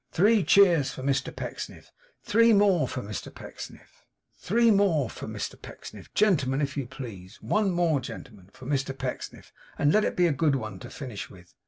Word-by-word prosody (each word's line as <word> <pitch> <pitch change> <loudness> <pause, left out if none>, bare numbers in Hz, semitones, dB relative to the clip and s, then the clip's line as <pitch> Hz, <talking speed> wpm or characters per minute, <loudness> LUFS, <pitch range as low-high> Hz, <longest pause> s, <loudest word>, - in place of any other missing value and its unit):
Three 210 +3 +4
cheers 170 -4 +5
for 130 - -8
Mr 135 0 0
Pecksniff! - - -7 0.3
Three 230 +1 +4
more 200 -5 +4
for 125 - -5
Mr 105 -1 -6
Pecksniff! - - -11 0.3
Three 230 +4 +2
more 180 - +2
for - - -8
Mr - - -6
Pecksniff, - - -11
gentlemen, 140 -11 +2
if 140 -1 -2
you 140 -4 -3
please! 115 -7 -9
One 210 -2 +1
more, 170 -5 +2
gentlemen, 105 -6 -10
for 130 - -14
Mr 135 -1 -2
Pecksniff, 130 -1 -6 0.3
and 145 +1 +3
let 215 - +4
it - - -1
be 180 - +4
a 170 - +3
good 145 +1 +2
one 110 -7 -5
to - - -9
finish 125 -8 -7
with! 90 -2 -16
145 Hz, 180 wpm, -27 LUFS, 125-195 Hz, 0.3 s, cheers